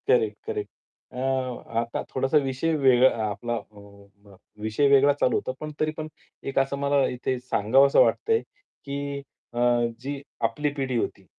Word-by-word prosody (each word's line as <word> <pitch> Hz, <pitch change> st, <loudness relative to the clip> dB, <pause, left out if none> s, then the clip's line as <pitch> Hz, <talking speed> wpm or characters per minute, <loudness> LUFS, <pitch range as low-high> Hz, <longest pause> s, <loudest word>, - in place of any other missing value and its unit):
Correct, 450 Hz, -1 st, +3 dB
correct. 425 Hz, -2 st, -3 dB, 0.4 s
अ, -, -, -11 dB, 0.6 s
आता 115 Hz, 0 st, -2 dB
थोडासा 135 Hz, +3 st, +1 dB
विषय 135 Hz, +5 st, -1 dB
वेगळा 130 Hz, -3 st, +5 dB, 0.2 s
आपला 120 Hz, +3 st, -3 dB, 1.1 s
विषय 110 Hz, +6 st, +2 dB
वेगळा 140 Hz, +1 st, +6 dB
चालू -, -, +3 dB
होता -, -, -1 dB
पण 155 Hz, 0 st, -5 dB
तरी 155 Hz, 0 st, +1 dB
पण 155 Hz, -1 st, -4 dB, 0.4 s
एक 135 Hz, -, +1 dB
असं 135 Hz, +1 st, 0 dB
मला 140 Hz, -1 st, +2 dB
इथे 125 Hz, +1 st, -2 dB
सांगावसं 130 Hz, +3 st, +3 dB
वाटतंय, 450 Hz, 0 st, +2 dB, 0.4 s
की 140 Hz, 0 st, -4 dB, 0.3 s
अ, 120 Hz, -, -3 dB, 0.4 s
जी 140 Hz, +2 st, -5 dB, 0.2 s
आपली 145 Hz, +6 st, +1 dB
पिढी 135 Hz, -4 st, -2 dB
होती, 100 Hz, -4 st, -3 dB
135 Hz, 140 wpm, -25 LUFS, 125-145 Hz, 1.1 s, वेगळा